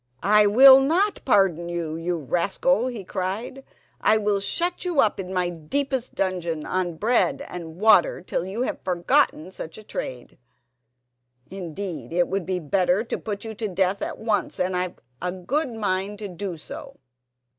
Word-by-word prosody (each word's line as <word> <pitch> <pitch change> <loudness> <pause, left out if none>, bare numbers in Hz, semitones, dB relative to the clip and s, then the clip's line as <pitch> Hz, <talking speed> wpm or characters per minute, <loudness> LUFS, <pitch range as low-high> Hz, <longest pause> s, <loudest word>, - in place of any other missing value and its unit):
"I 210 +1 +5
will 265 +5 +9
not 350 +9 +1
pardon 190 - +3
you, 170 -2 -3
you 170 +1 -2
rascal," 190 - +1
he 235 -6 -5
cried; 195 +9 -4 0.4
"I 220 - +4
will 205 -1 +1
shut 345 - -1
you 350 -5 -1
up 215 -5 +3
in 185 -1 -5
my 180 -2 0
deepest 260 - -2
dungeon 175 -5 -2
on 180 -2 -1
bread 230 +8 +1
and 165 -3 -8
water 205 -1 +4
till 175 - -2
you 195 +7 -3
have - - -3
forgotten 185 - +1
such 160 -3 -7
a 215 - -11
trade. 125 -12 -7 1.1
Indeed, 175 -7 -6
it 175 +1 +2
would 190 -2 -3
be 185 -1 0
better 180 +4 +1
to 235 - -3
put 205 0 -5
you 220 - -5
to 220 0 -3
death 190 +1 0
at - - -4
once, 215 -5 -1
and 180 0 0
I've 180 0 -2 0.3
a 180 +1 -1
good 245 - -2
mind 200 -1 -2
to 205 0 -6
do 180 -1 -5
so." 155 - -9
190 Hz, 165 wpm, -24 LUFS, 175-220 Hz, 1.1 s, will